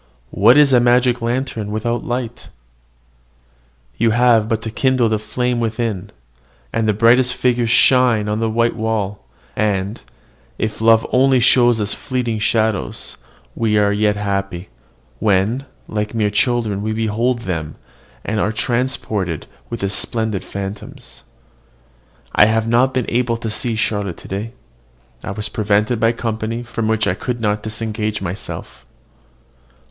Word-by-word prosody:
What 115 Hz, +7 st, +5 dB
is 145 Hz, -2 st, +5 dB
a 125 Hz, -, +7 dB
magic 125 Hz, 0 st, +3 dB
lantern 120 Hz, -3 st, -2 dB
without 115 Hz, +3 st, -2 dB
light? 120 Hz, -1 st, -4 dB, 1.5 s
You 115 Hz, +1 st, +3 dB
have 115 Hz, -1 st, +3 dB
but 115 Hz, 0 st, -1 dB
to 110 Hz, -, -4 dB
kindle 130 Hz, 0 st, +2 dB
the 110 Hz, -1 st, 0 dB
flame 125 Hz, +3 st, -1 dB
within, 110 Hz, -4 st, -2 dB, 0.6 s
and 115 Hz, -1 st, 0 dB
the 105 Hz, -, +3 dB
brightest 120 Hz, +4 st, +4 dB
figures 120 Hz, -2 st, +1 dB
shine 120 Hz, -3 st, +4 dB
on 105 Hz, +1 st, -1 dB
the 115 Hz, 0 st, 0 dB
white 115 Hz, +1 st, +1 dB
wall; 110 Hz, -3 st, -2 dB, 0.3 s
and, 100 Hz, 0 st, -1 dB, 0.6 s
if 110 Hz, 0 st, -3 dB
love 115 Hz, 0 st, +5 dB
only 130 Hz, 0 st, +4 dB
show 120 Hz, 0 st, +5 dB
us 110 Hz, -3 st, 0 dB
fleeting 125 Hz, -5 st, -2 dB
shadows, 110 Hz, -1 st, -1 dB, 0.4 s
we 110 Hz, -2 st, +1 dB
are 105 Hz, -1 st, +3 dB
yet 105 Hz, 0 st, +2 dB
happy, 100 Hz, -3 st, -3 dB, 0.5 s
when, 110 Hz, +6 st, +1 dB, 0.2 s
like 105 Hz, +1 st, -3 dB
mere 105 Hz, -2 st, +1 dB
children, 110 Hz, -3 st, 0 dB
we 110 Hz, +1 st, -2 dB
behold 115 Hz, +3 st, 0 dB
them, 80 Hz, -5 st, -4 dB, 0.5 s
and 110 Hz, +1 st, -1 dB
are 105 Hz, -, +1 dB
transported 110 Hz, -, -2 dB, 0.2 s
with 115 Hz, -, -5 dB
the 100 Hz, -, 0 dB
splendid 110 Hz, -2 st, -2 dB
phantoms. 100 Hz, +1 st, -8 dB, 1.1 s
I 105 Hz, -, +7 dB
have 110 Hz, +1 st, +1 dB
not 120 Hz, +3 st, +3 dB
been 130 Hz, -2 st, -1 dB
able 120 Hz, -1 st, 0 dB
to 115 Hz, -1 st, -4 dB
see 115 Hz, +2 st, -2 dB
Charlotte 105 Hz, -4 st, -1 dB
to -, -, -12 dB
day. 105 Hz, +5 st, -5 dB, 0.7 s
I -, -, -5 dB
was 105 Hz, +2 st, -3 dB
prevented 105 Hz, +2 st, 0 dB
by 115 Hz, 0 st, +3 dB
company 115 Hz, 0 st, -3 dB
from 115 Hz, -2 st, -3 dB
which 110 Hz, -1 st, +1 dB
I -, -, +1 dB
could 120 Hz, +5 st, -4 dB
not 105 Hz, -2 st, 0 dB
disengage 110 Hz, -1 st, -3 dB
myself. 95 Hz, +1 st, -6 dB
110 Hz, 145 wpm, -19 LUFS, 105-120 Hz, 1.5 s, a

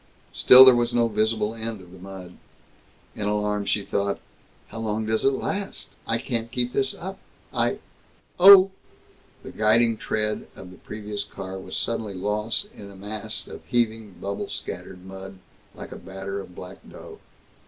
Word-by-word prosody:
Still 130 Hz, +1 st, +9 dB
there 130 Hz, -, +9 dB
was 120 Hz, 0 st, 0 dB
no 120 Hz, -1 st, +4 dB
visible 110 Hz, 0 st, 0 dB
end 115 Hz, -1 st, -5 dB
of 90 Hz, -1 st, -14 dB
the 95 Hz, -, -13 dB
mud. 95 Hz, -1 st, -10 dB, 0.8 s
In 105 Hz, -, -3 dB
alarm 105 Hz, 0 st, 0 dB
she 100 Hz, 0 st, 0 dB
thought, 100 Hz, 0 st, -1 dB, 0.5 s
"How 115 Hz, -, -7 dB
long 110 Hz, 0 st, -2 dB
does 110 Hz, 0 st, 0 dB
it -, -, +6 dB
last? 200 Hz, +8 st, -4 dB, 0.2 s
I 115 Hz, -, +1 dB
can't 115 Hz, -1 st, -3 dB
keep 125 Hz, 0 st, -1 dB
this 135 Hz, -1 st, 0 dB
up. 190 Hz, +2 st, -7 dB, 0.3 s
I -, -, +1 dB, 0.6 s
Oh!" 195 Hz, +1 st, +10 dB, 0.7 s
The -, -, -8 dB
guiding 115 Hz, +1 st, +3 dB
tread 105 Hz, 0 st, -2 dB
of 90 Hz, -1 st, -11 dB
the 90 Hz, -, -13 dB
previous 105 Hz, -1 st, -6 dB
car 95 Hz, -2 st, -7 dB
was 95 Hz, -, -6 dB
suddenly 110 Hz, -4 st, -2 dB
lost 105 Hz, -, -1 dB
in 100 Hz, -, -11 dB
a 100 Hz, -, -13 dB
mass 105 Hz, +2 st, -5 dB
of -, -, -10 dB
heaving, 115 Hz, -4 st, 0 dB
bubble 100 Hz, 0 st, -4 dB
scattered 90 Hz, -1 st, -7 dB
mud, 95 Hz, 0 st, -9 dB, 0.4 s
like -, -, -9 dB
a -, -, -7 dB
batter 95 Hz, +2 st, -6 dB
of 90 Hz, -2 st, -10 dB
black 90 Hz, +1 st, -9 dB
dough. -, -, -11 dB
105 Hz, 165 wpm, -25 LUFS, 100-115 Hz, 0.8 s, Oh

